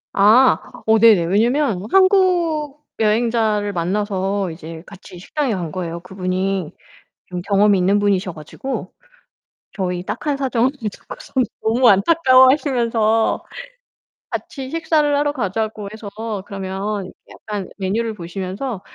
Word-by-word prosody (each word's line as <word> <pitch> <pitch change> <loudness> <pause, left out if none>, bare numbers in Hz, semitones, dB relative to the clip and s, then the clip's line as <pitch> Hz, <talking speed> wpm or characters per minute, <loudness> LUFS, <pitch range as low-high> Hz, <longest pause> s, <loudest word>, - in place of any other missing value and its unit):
아 225 +6 +5 0.3
어 220 0 +4
네네. 215 -6 +6
왜냐면 220 - +1
한국 345 -7 +2
여행자를 220 -2 +1
만나서 195 +1 -1
이제 160 0 -9
같이 190 -2 -13
식당에 260 - -2
간 170 -4 -4
거예요. 170 0 -5
그분이 185 -1 -2 0.6
좀 180 -1 -5
경험이 200 +1 +3
있는 190 +3 +3
분이셔 200 -2 0
가지고 190 - -6 0.8
저희 180 -3 -3
딱한 290 +5 -2
사정을 260 -2 +1 0.2
듣고서 - - -12 0.3
너무 235 +3 +3
안타까워하시면서 245 - +3 0.9
같이 265 -2 -6
식사를 315 -2 +1
하러 290 0 +1
가자고 215 -3 -3
해서 215 -1 -8 0.4
그러면 195 0 -4 0.2
약간 205 -3 -6
메뉴를 215 +4 -1
보시면서 190 +5 -5
210 Hz, 270 characters per minute, -20 LUFS, 190-255 Hz, 0.9 s, 네네